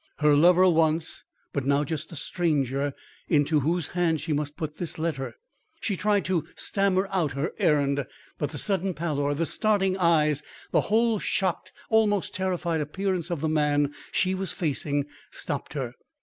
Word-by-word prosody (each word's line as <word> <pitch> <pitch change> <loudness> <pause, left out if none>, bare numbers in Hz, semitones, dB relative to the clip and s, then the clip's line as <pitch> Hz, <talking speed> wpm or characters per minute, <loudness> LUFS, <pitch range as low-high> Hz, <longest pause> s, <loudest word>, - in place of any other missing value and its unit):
her 150 -1 +4
lover 180 +4 +6
once, 160 -1 +1 0.3
but 140 - -1
now 140 +2 +2
just 155 +2 -4
a - - -8
stranger 145 -4 0 0.3
into 150 0 +3
whose 165 +3 0
hand 170 -3 +1
she 160 - -2
must 145 0 -2
put 155 -1 -4
this 175 - -4
letter. 155 -5 -3 0.4
She 205 - -1
tried 205 +1 +1
to 180 -5 +1
stammer 195 -1 +1
out 170 -7 0
her 140 +5 -2
errand; 145 -6 +2 0.3
but 145 - -1
the 145 - -7
sudden 190 0 -1
pallor, 145 -3 -1
the 165 +3 0
starting 195 -1 +1
eyes 155 -4 +3 0.3
the - - +4
whole 225 0 +3
shocked, 185 -1 -1 0.2
almost 210 -3 +2
terrified 180 -3 -1
appearance 185 +3 -2
of 170 -5 -2
the 160 - +1
man 145 -2 +2 0.2
she 185 0 +2
was 190 -1 -2
facing, 145 -3 -1 0.2
stopped - - -5
her. - - -3
165 Hz, 165 wpm, -26 LUFS, 145-185 Hz, 0.4 s, lover